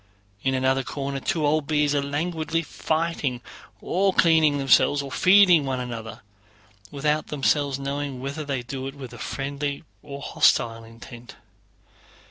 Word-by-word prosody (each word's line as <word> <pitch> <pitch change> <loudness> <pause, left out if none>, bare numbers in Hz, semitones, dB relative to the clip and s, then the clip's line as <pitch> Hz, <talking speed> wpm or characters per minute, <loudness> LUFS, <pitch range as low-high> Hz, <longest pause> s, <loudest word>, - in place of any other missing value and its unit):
In 130 0 0
another 130 +1 +1
corner 140 +1 -4
two 155 +2 -1
old 150 0 +1
bees 150 -1 +1
are 145 - +1
languidly 160 +3 -2
fighting, 155 -5 -2 0.4
or 195 +2 +1
cleaning 160 -3 +4
themselves, 140 +1 +3
or 135 - -8
feeding 185 -1 +5
one 135 -2 -2
another, 115 -2 -6 0.7
without 150 +2 -1
themselves 145 -1 0
knowing 140 -1 -4
whether 140 +4 -5
they 135 -4 -3
do 130 +1 -6
it 135 - -8
with 130 -4 -9
friendly 140 +2 -4 0.2
or 140 -2 -8
hostile 115 -4 +1
intent. 115 +1 -12
140 Hz, 135 wpm, -24 LUFS, 130-155 Hz, 0.7 s, feeding